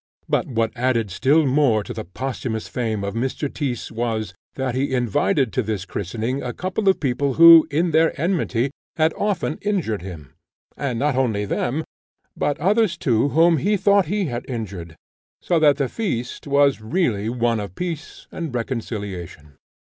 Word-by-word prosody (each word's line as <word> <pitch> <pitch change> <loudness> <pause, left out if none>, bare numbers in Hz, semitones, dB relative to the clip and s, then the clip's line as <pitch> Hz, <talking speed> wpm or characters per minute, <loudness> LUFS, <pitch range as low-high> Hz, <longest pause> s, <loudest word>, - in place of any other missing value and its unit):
But - - 0
what 115 -3 0
added 120 -4 0
still 145 - +3
more 130 -6 +3
to - - -7
the - - -5
posthumous 110 +3 -4
fame 110 -4 -2
of 100 0 -3
Mr. 130 +5 -2
Tyss 130 -6 -3
was, 110 -3 -2 0.2
that 130 -2 -2
he 130 +1 0
invited 125 +1 +1
to 130 - +1
this 105 -4 -3
christening 110 +8 -3
a 125 - -4
couple 190 +2 -1
of 190 - +2
people 135 0 0
who, 165 -1 +9
in 165 +4 +1
their 160 0 +2
enmity, 145 -7 0 0.3
had 160 0 +3
often 190 -7 -2
injured 180 - -1
him; 85 -7 -9 0.4
and 130 -5 -2
not 145 +2 +1
only 110 -6 0
them, 140 +9 -1 0.5
but 145 - -1
others 200 +2 +2
too 125 -1 +1
whom 165 +2 +4
he 205 +8 +1
thought 200 -1 +3
he 200 +2 0
had 120 -5 -4
injured; 95 -9 -6 0.4
so 170 -2 +1
that 150 -2 +5
the 140 - 0
feast 125 - -4
was 140 -3 +3
really 110 - 0
one 120 -1 0
of 100 -3 -6
peace 170 -3 -5
and 160 -7 -5
reconciliation. 100 - -5
130 Hz, 165 wpm, -22 LUFS, 110-160 Hz, 0.5 s, who